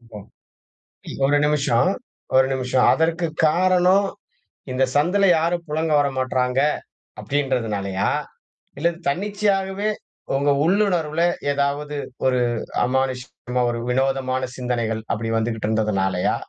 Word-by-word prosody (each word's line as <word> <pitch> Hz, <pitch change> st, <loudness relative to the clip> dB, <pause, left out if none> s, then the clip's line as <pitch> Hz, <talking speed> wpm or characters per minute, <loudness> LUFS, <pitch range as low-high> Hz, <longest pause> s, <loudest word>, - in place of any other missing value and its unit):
ஓ! -, -, -5 dB, 1.1 s
1 145 Hz, +1 st, +3 dB
நிமிஷம் 150 Hz, 0 st, +2 dB, 0.5 s
1 130 Hz, 0 st, +6 dB
நிமிஷம். 130 Hz, -1 st, +1 dB
அதற்கு 165 Hz, +1 st, +1 dB, 0.2 s
காரணம் 185 Hz, +4 st, +3 dB, 0.6 s
இந்த 130 Hz, +1 st, +1 dB
சந்துல 180 Hz, +7 st, +3 dB
யாரும் 170 Hz, +1 st, -1 dB
புழங்க 155 Hz, +1 st, -1 dB
வரமாட்றாங்க 130 Hz, -2 st, 0 dB, 0.6 s
அப்டின்றதுனாலையா? 115 Hz, -9 st, -1 dB, 0.7 s
இல்ல 165 Hz, +4 st, +2 dB, 0.2 s
தன்னிச்சையாகவே 200 Hz, +1 st, 0 dB, 0.5 s
உங்கள் 140 Hz, 0 st, +2 dB
உள்ளுணர்வுல 175 Hz, -4 st, +1 dB, 0.3 s
ஏதாவது 145 Hz, +1 st, -1 dB, 0.3 s
ஒரு 130 Hz, -1 st, +3 dB, 0.4 s
அமானுஷ்யமா 125 Hz, -1 st, -2 dB
ஒரு 120 Hz, 0 st, -2 dB
விநோதமான 130 Hz, 0 st, 0 dB
சிந்தனைகள் 120 Hz, -3 st, -2 dB
அப்படி 115 Hz, 0 st, -2 dB
வந்துட்டு 115 Hz, -1 st, -2 dB
இருந்ததுனாலயா? 95 Hz, -4 st, 0 dB
135 Hz, 95 wpm, -22 LUFS, 125-170 Hz, 1.1 s, 1